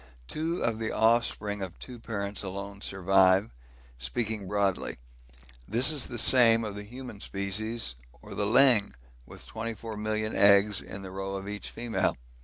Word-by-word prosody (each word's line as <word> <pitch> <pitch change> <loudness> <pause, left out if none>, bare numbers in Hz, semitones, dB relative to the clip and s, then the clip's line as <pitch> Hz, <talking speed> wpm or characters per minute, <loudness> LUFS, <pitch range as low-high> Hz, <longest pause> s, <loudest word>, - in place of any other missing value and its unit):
Two 165 +3 -2
of 115 -1 0
the 110 - -2
offspring 110 -2 +1
of 95 -3 -6
two 125 -2 -9
parents 100 -3 -4
alone 100 +1 -7
survive, 95 +1 +3 0.5
speaking 105 - -3
broadly; 100 -1 -1 0.7
this 120 +8 +5 0.2
the 120 - -6
same 115 -1 +5
of 105 -2 -4
the 105 - -7
human 120 0 -9
species 100 - -3 0.3
or - - -11
the 100 -1 -1
'ling,' 120 - +5 0.3
with - - -11
24,000,000 110 -1 -4
eggs 100 0 +4
in 100 - -9
the 95 - -8
roe 95 +1 -4
of 95 0 -6
each 105 0 -6
female! 120 -1 -1
105 Hz, 145 wpm, -28 LUFS, 100-115 Hz, 0.7 s, this